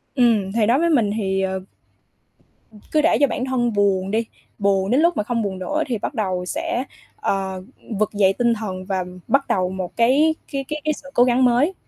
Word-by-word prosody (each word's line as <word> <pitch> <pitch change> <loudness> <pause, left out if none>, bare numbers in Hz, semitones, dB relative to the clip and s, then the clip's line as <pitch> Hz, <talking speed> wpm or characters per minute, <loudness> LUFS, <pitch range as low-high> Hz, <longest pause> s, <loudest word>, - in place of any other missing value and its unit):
Ừm, 225 -7 +3
thì 220 +1 +2
nói 240 +5 +3
với 340 +1 +2
mình 235 -10 +2
thì, 195 -2 0
ờ 190 0 -1 1.1
Ừm, 215 - -15
cứ 305 - +3
để 330 - +3
cho 285 - +6
bản 255 - -3
thân 240 -3 0
buồn 195 -2 +1
đi, 225 +2 0 0.3
buồn 200 0 +1
đến 270 +5 +4
lúc 340 +1 +3
mà - - +1
không 230 +2 -1
buồn 195 -3 -3
nữa 300 +12 -1
thì 240 - -1
bắt 210 - -4
đầu 185 -6 -2
sẽ, 330 - -2 0.3
ờ, 190 - -2 0.4
vực 215 0 0
dậy 195 -2 +3
tinh 235 +2 +2
thần 190 -4 -5
và 190 -1 -1 0.2
bắt 275 0 +2
đầu 185 -1 +1
một 185 -2 -5
cái 280 +7 +3 0.2
cái 275 -1 -3
cái 300 +1 -4
cái 305 0 +1
sự 280 -1 -11
cố 245 - +5
gắng 250 +1 +3
mới. 250 +9 +3
230 Hz, 215 wpm, -21 LUFS, 195-275 Hz, 1.1 s, cho